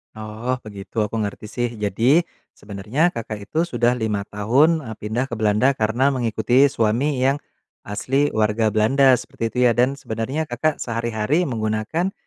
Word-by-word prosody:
Oh 110 +3 -4
begitu 105 +1 -5
aku 105 +2 -2
ngerti 100 +1 -7
sih, 120 -1 -2
jadi 115 - +2 0.3
sebenarnya 105 - -1
Kakak 110 -6 -7
itu 165 +2 +1
sudah 120 -3 +1
5 105 -3 -1
tahun, 135 +10 +2
eee, 110 -1 -6
pindah 110 +5 -1
ke 125 - -9
Belanda 110 +4 +2
karena 125 +4 +1
mengikuti 120 +2 +2
suami 125 +5 0
yang 140 +2 +1 0.4
asli 135 +8 0
warga 110 +1 +1
Belanda 130 +5 +4
seperti 115 - -8
itu - - -10
ya, 120 - +5
dan 125 +4 +1
sebenarnya 130 +6 -3
Kakak 145 +4 -1
sehari-hari 120 +7 -1
menggunakan 110 - -1
115 Hz, 150 wpm, -22 LUFS, 110-135 Hz, 0.4 s, ya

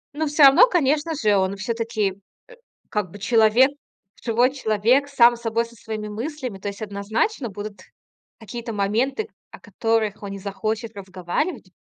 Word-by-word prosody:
Ну, 315 +1 -1
всё 295 +1 +3
равно, 275 - +8
конечно 310 - +1
же, 215 -8 +2
он 190 +1 0
все-таки, 225 -1 -1 0.3
э, - - -15 0.4
как 210 -4 -2
бы - - -10
человек 225 +5 +4 0.5
живой 240 +2 +2
человек 250 +2 +2
сам 240 -3 +5
собой, 230 0 -1
со 235 0 -16
своими 215 -1 -6
мыслями. 245 0 -5
То 195 - -6
есть, 200 +1 -10
однозначно 220 - -2
будут 205 0 -8 0.6
какие-то 230 +1 -7
моменты, 225 - 0 0.2
о - - -12
которых 225 -2 -1
он 200 - -5
не 195 - -6
захочет 215 +3 -4
разговаривать. 190 - -4
225 Hz, 150 wpm, -23 LUFS, 205-260 Hz, 0.6 s, равно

